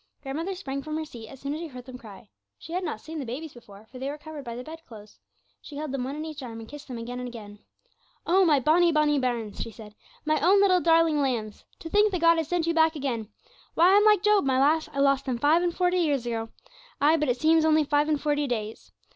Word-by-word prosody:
Grandmother 320 +8 -4
sprang 275 -7 -5
from 310 +2 -4
her 315 - -3
seat 235 -6 -11
as 270 - -12
soon 280 +1 -4
as 310 - -4
she 335 - -5
heard 250 -4 -11
them 255 -1 -10
cry. 215 -1 -13 0.3
She 325 - -10
had 365 +1 -1
not 300 -10 -4
seen 315 +1 -7
the - - -3
babies 280 +6 -6
before, 210 -3 -15
for 255 +3 -12
they 270 +2 -3
were 290 - -5
covered 305 -1 -9
by 235 -2 -6
the 250 - -6
bed 320 +3 -10
clothes. 210 -3 -14 0.4
She 295 - -11
held 300 -2 -4
them 265 -2 -2
one 275 +2 -5
in 305 +1 -5
each 305 -2 -7
arm, 230 -3 -7
and 225 - -10
kissed 295 +3 -11
them 250 -3 -6
again 245 +2 -6
and 250 - -5
again. 210 -4 -10 0.7
'Oh, 380 +3 +4
my 305 -5 +4
bonny, 335 +6 +4
bonny 300 -2 +2
bairns!' 235 -5 -3
she - - -4
said; 215 -1 -12 0.3
'my 310 0 +2
own 375 +6 +4
little 370 -3 +4
darling 330 -2 +3
lambs! 230 -6 -3 0.2
To - - -7
think 415 +4 +3
that 365 - -1
God 335 - +5
Almighty 335 0 +4
has 320 - -2
sent 345 -1 0
you 335 - 0
back 320 0 +3
again! 240 -7 -3 0.5
Why, 355 +4 +5
I'm 410 - +5
like 420 -3 +4
Job, 420 -1 +4
my 265 -1 +1
lass; 310 +3 +2
I - - -9
lost 275 -1 +2
them 255 -3 -2
five 300 +7 +3
and 350 -1 0
forty 360 0 +1
years 285 -7 0
ago; 225 -1 -3 0.5
ay, 300 +3 +4
but 300 -3 0
it 245 0 0
seems 320 +2 +4
only 315 -1 +4
five 295 +1 +1
and 300 -2 +1
forty 290 0 0
days. 220 -3 -5
290 Hz, 265 wpm, -26 LUFS, 245-325 Hz, 0.7 s, God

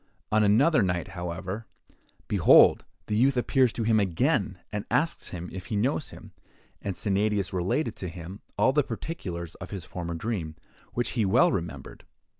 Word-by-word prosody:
On 105 0 +4
another 120 +8 +4
night, 90 -3 -1
however, 90 +4 -5 0.6
behold! - - +6 0.2
the 105 - -2
youth 130 +4 +3
appears 125 0 +3
to 115 - -2
him 110 0 +3
again, 100 - +1
and 105 -1 -3
asks 165 +2 0
him 90 -1 -6
if 95 -1 -7
he 110 - -3
knows 130 +7 0
him; - - -12 0.5
and 95 -3 -4
Sennadius 100 -1 0
related 115 - 0
to 95 - -4
him 90 +4 -9 0.2
all 130 - +4
the 150 - +4
particulars 95 - -5
of 95 - -7
his 95 -5 -6
former 85 -2 -5
dream, 85 -5 -3 0.4
which 120 - -1
he 115 - 0
well 100 +5 +4
remembered. 85 -4 -5
100 Hz, 165 wpm, -27 LUFS, 90-120 Hz, 0.6 s, behold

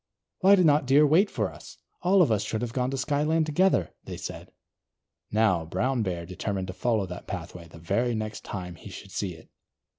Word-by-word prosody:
"Why 195 +1 +7
did 185 -3 +3
not 145 -3 +4
Deer 145 +3 +6
wait 170 +8 +4
for - - -2
us? - - -13 0.2
All 185 +1 +5
of 130 - +1
us 105 - +2
should 110 +1 -3
have 120 -1 -4
gone 125 -1 0
to 135 - -3
Skyland 150 +4 +1
together," 155 - +2
they - - -6
said. - - -7 0.8
Now, 105 -6 +2
Brown 125 +10 -1
Bear 90 -4 -2
determined 95 +2 -3
to - - -4
follow 110 -1 0
that 90 -1 -8
pathway 90 -2 -7
the 80 - -14
very 115 +9 0
next 110 0 -4
time 90 -3 -6
he 85 - -12
should 95 0 -10
see 95 -3 -3
it. 80 - -17
110 Hz, 205 wpm, -27 LUFS, 95-145 Hz, 0.8 s, Why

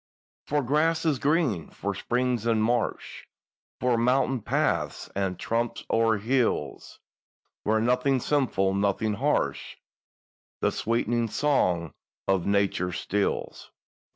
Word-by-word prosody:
For 145 0 +1
grasses 155 +2 +1
green, 140 - +1
for 100 0 -4
springs 120 +2 -1
and 110 -2 +2
marsh, 120 0 -2 0.5
For 125 -2 +2
mountain 130 +1 +2
paths - - -1
and 95 -2 -1
tramps 115 +1 -2
o'er 115 -1 +3
hills 115 - -1 0.6
Where 110 +1 +1
nothing 125 +3 +2
sinful—nothing 100 -6 +1
harsh— 140 +8 -1 0.8
The - - +1
sweetening 115 0 0
song 90 - +1 0.3
of 95 -3 +1
Nature 100 -3 +1
stills! 100 +3 -2
115 Hz, 100 wpm, -26 LUFS, 100-130 Hz, 0.8 s, o'er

